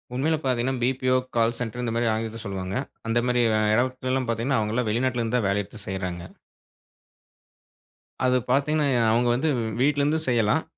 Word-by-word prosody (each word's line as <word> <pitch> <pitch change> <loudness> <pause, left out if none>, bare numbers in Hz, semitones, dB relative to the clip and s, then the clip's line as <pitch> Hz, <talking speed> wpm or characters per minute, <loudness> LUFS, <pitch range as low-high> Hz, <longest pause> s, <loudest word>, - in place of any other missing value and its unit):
உண்மைல 155 +5 +1
பார்த்தீங்கன்னா, 130 0 0
BPO, 130 0 +2 0.2
call 115 0 +2
centre 125 0 -4
இந்த 120 - -1
மாதிரி 115 0 +1
ஆங்கிலத்துல 110 0 -4
சொல்வாங்க. 95 -1 -4 0.3
அந்த 115 +1 +2
மாரி 125 0 +2 0.2
அ - - +2
இடத்துல்லாம் 130 +2 0
பார்த்தீங்கன்னா, 115 +3 +1
அவங்கள்லாம் 110 +2 -1
வெளிநாட்டுல 120 +2 0
இருந்து 115 +2 0
தான் 110 -5 0
வேலை 100 +1 +1
எடுத்து 105 +1 -11
செய்றாங்க. 90 -2 -4 2.0
அது 125 0 +4
பார்த்தீங்கன்னா 145 +2 +2
எ - - +3
அவங்க 120 +2 +2
வந்து 150 +6 0 0.3
வீட்டிலிருந்து 145 +2 +2
செய்யலாம். 120 +4 +2
120 Hz, 155 wpm, -25 LUFS, 110-130 Hz, 2.0 s, அது